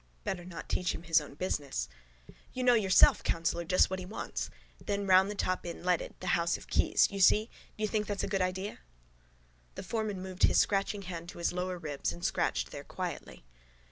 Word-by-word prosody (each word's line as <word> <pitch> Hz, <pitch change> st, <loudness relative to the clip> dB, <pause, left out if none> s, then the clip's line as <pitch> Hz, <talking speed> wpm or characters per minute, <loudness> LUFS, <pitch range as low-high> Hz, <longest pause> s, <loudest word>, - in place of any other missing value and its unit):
Better 180 Hz, -2 st, -3 dB
not 170 Hz, -3 st, -8 dB
teach 180 Hz, -, -1 dB
him -, -, -8 dB
his 165 Hz, -2 st, +4 dB
own 145 Hz, -1 st, -11 dB
business. 145 Hz, -, -2 dB, 0.7 s
—You 255 Hz, -, -2 dB
know 250 Hz, -1 st, +6 dB
yourself, 195 Hz, -5 st, +5 dB
councillor, 165 Hz, +1 st, -1 dB
just 185 Hz, +2 st, +3 dB
what 190 Hz, -, -2 dB
he 185 Hz, -, -6 dB
wants. 215 Hz, -, -4 dB, 0.3 s
Then 200 Hz, 0 st, -2 dB
round 190 Hz, +1 st, +5 dB
the 210 Hz, -, -4 dB
top 185 Hz, -2 st, -1 dB
in 175 Hz, 0 st, -7 dB
leaded: 180 Hz, -2 st, 0 dB
the -, -, -6 dB
house 170 Hz, 0 st, +1 dB
of -, -, -13 dB
keys. -, -, +3 dB
You 200 Hz, -, -4 dB
see? 210 Hz, +4 st, +5 dB, 0.3 s
Do 215 Hz, -, -4 dB
you -, -, +2 dB
think 210 Hz, 0 st, -1 dB
that's 205 Hz, -1 st, -2 dB
a -, -, -1 dB
good 195 Hz, -1 st, 0 dB
idea? 185 Hz, +2 st, -2 dB, 1.0 s
The -, -, -6 dB
foreman 215 Hz, 0 st, -2 dB
moved 185 Hz, -1 st, -8 dB
his -, -, +5 dB
scratching 200 Hz, 0 st, +1 dB
hand 170 Hz, -2 st, -6 dB
to 200 Hz, -, -10 dB
his 170 Hz, -, -1 dB
lower 180 Hz, 0 st, -2 dB
ribs 150 Hz, -, -3 dB
and 85 Hz, 0 st, -6 dB
scratched -, -, 0 dB
there -, -, -7 dB
quietly. -, -, -6 dB
185 Hz, 205 wpm, -31 LUFS, 170-200 Hz, 1.0 s, know